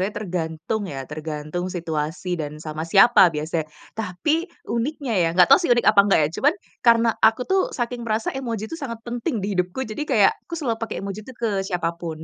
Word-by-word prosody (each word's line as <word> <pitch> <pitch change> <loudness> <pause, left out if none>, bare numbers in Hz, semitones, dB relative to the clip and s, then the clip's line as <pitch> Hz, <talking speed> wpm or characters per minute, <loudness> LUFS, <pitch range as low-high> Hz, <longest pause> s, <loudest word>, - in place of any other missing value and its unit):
tergantung, 180 0 -3
ya, 135 -5 -5
tergantung 155 +4 -5
situasi 170 0 -3
dan 150 0 -6
sama 155 +1 -5
siapa 195 +2 +7
biasanya. 155 0 -2 0.2
Tapi 225 - -1 0.2
uniknya, 240 -2 -2
ya 170 - +3
enggak 180 +7 +5
tahu 275 - +9
sih 350 - -1
unik 240 -1 +3
apa 205 -1 +5
enggak, 195 - +4
ya, 150 - +1
cuman, 290 +4 +4 0.3
karena 230 -1 +4
aku 225 +3 +4
tuh 380 +7 +2
saking 240 -2 -3
merasa 220 0 0
emoji 230 -5 -4
itu 330 - -5
sangat 230 -5 -6
penting 240 - -3
di 205 - -2
hidupku, 180 +6 -1
jadi 220 +2 -7
kayak 215 -7 +5 0.2
aku 335 - -5
selalu 245 -9 -2
pakai 230 - -4
emoji 200 +3 -6
itu 260 - -9
ke 215 -4 -1
siapa 175 -3 -1
pun, 160 -2 -6
205 Hz, 195 wpm, -23 LUFS, 165-235 Hz, 0.3 s, tahu